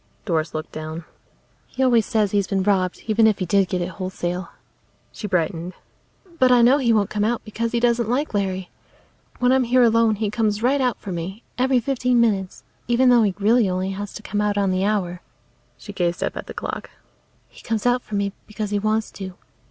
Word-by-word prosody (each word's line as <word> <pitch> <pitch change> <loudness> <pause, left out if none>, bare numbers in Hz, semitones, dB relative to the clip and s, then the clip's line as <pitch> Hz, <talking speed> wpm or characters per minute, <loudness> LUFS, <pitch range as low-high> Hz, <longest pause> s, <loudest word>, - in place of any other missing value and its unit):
Doris 160 -4 -1
looked 155 +1 -5
down. 155 +1 -6 0.6
"He 265 - -2
always 235 -4 +3
says 215 -4 +1
he's 200 -2 +1
been 195 -1 0
robbed, 185 -2 0
even 220 0 +4
if 215 - +2
he 185 - -2
did 195 +2 +2
get 180 0 -1
it 175 - -4
wholesale." 185 0 -3 0.6
She 210 - -6
brightened. 180 -1 -1 0.7
"But 255 -1 +5
I 245 -1 +6
know 260 +5 +5
he 240 -4 +2
won't 210 -3 +2
come 210 -1 0
out 235 +2 0
because 230 +1 -3
he 235 - +1
doesn't 235 -1 +1
like 275 +3 -1
Larry. 190 -2 -2 0.7
When 250 0 +2
I'm 260 -1 +3
here 250 +1 +4
alone 230 -1 +4
he 210 0 -2
comes 215 -1 0
right 270 +3 +2
out 250 -3 +1
for 195 - -8
me, 185 +6 -5 0.2
every 260 0 +3
fifteen 250 0 +1
minutes, 200 -5 0 0.2
even 245 +2 +4
though 245 -1 +6
he 200 -4 +1
really 215 +1 +3
only 185 +1 -1
has 200 +1 -5
to 215 - -8
come 205 +1 -2
out 205 -1 0
on 200 -2 +2
the 185 +1 0
hour." 185 -4 -1 0.6
She 205 - -10
gazed 175 -2 -1
up - - -2
at - - -6
the - - -8
clock. - - -5 0.6
"He - - -17
comes 225 -2 -2
out 245 0 +3
for 215 - -7
me 200 -1 -1
because 215 -1 -5
he 205 - +1
wants 215 +1 0
to. 190 -2 -8
210 Hz, 215 wpm, -22 LUFS, 190-235 Hz, 0.7 s, I